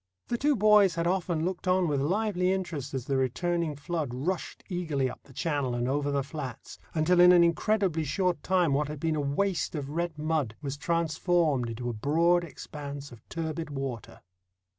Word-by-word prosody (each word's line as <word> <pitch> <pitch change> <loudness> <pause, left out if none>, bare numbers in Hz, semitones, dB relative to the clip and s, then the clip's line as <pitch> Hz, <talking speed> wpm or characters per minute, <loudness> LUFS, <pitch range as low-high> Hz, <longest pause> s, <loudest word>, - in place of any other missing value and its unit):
The 240 - 0
two 290 +1 +3
boys 210 -4 +5
had 170 0 -1
often 175 -3 0
looked 185 0 -3
on 185 -1 +3
with 145 -3 0
lively 185 +3 +1
interest 160 -8 -3
as 130 -2 -3
the 135 -1 0
returning 160 +5 0
flood 150 -1 -3
rushed 170 +8 -3
eagerly 160 -7 -1
up - - -8
the - - -19
channel 140 -3 -1
and 120 0 -1
over 145 +2 0
the 140 -1 0
flats, 140 -4 -7 0.2
until 170 +3 +3
in 180 0 +9
an 175 -1 +7
incredibly 170 -1 +1
short 180 +4 0
time 180 -5 +2
what 145 +1 +1
had 150 -1 -6
been 160 +1 0
a 150 - 0
waste 165 +5 0
of 140 -2 -4
red 170 0 -2
mud 150 -7 -1
was 140 -2 -4
transformed 165 -4 +1
into 120 +2 -5
a 120 - -1
broad 165 +9 +2
expanse 145 -3 -8
of 120 -3 -13
turbid 160 -1 -4
water. 135 -5 -5
160 Hz, 185 wpm, -28 LUFS, 140-175 Hz, 0.2 s, in